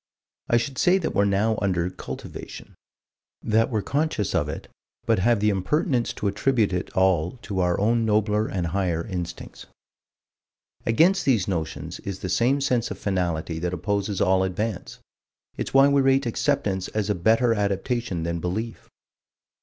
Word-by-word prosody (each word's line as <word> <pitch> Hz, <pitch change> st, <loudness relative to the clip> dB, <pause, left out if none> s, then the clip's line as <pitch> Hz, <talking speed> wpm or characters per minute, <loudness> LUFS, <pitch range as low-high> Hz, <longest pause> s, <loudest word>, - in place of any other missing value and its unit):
I 120 Hz, -, +4 dB
should 130 Hz, +3 st, -3 dB
say 180 Hz, +2 st, +4 dB
that 180 Hz, -, -2 dB
we're 100 Hz, -, +3 dB
now 105 Hz, +2 st, +1 dB
under 90 Hz, -3 st, 0 dB
cultivation: -, -, -9 dB, 0.7 s
that 110 Hz, 0 st, +2 dB
we're 110 Hz, -5 st, -1 dB
conscious 145 Hz, -, -1 dB
of -, -, +1 dB
it, -, -, -6 dB, 0.4 s
but 115 Hz, -4 st, +2 dB
have 115 Hz, +3 st, +3 dB
the 105 Hz, 0 st, +3 dB
impertinence 120 Hz, -, 0 dB
to 105 Hz, -, -3 dB
attribute 105 Hz, 0 st, +1 dB
it 90 Hz, -, -2 dB
all 90 Hz, -3 st, +2 dB
to 100 Hz, -3 st, -3 dB
our 90 Hz, -1 st, +1 dB
own 115 Hz, +3 st, +2 dB
nobler 105 Hz, 0 st, +1 dB
and 90 Hz, -2 st, -2 dB
higher 85 Hz, -1 st, -1 dB
instincts. 90 Hz, -4 st, -6 dB, 1.2 s
Against 165 Hz, +12 st, +4 dB
these 115 Hz, -9 st, +2 dB
notions 85 Hz, -5 st, -4 dB
is 95 Hz, -2 st, -5 dB
the 95 Hz, -, -5 dB
same 125 Hz, +9 st, +2 dB
sense 125 Hz, -4 st, +1 dB
of -, -, -6 dB
finality 85 Hz, -4 st, -2 dB
that 90 Hz, +1 st, -2 dB
opposes 100 Hz, +1 st, -2 dB
all 95 Hz, 0 st, +3 dB
advance. 95 Hz, +2 st, -3 dB, 0.6 s
It's -, -, -4 dB
why 135 Hz, +1 st, +6 dB
we 140 Hz, 0 st, +3 dB
rate 135 Hz, 0 st, +3 dB
acceptance 105 Hz, -6 st, 0 dB
as 105 Hz, -1 st, -1 dB
a -, -, +3 dB
better 115 Hz, +6 st, +3 dB
adaptation 100 Hz, -2 st, -1 dB
than 85 Hz, 0 st, -2 dB
belief. 105 Hz, +7 st, -4 dB
105 Hz, 160 wpm, -24 LUFS, 95-120 Hz, 1.2 s, why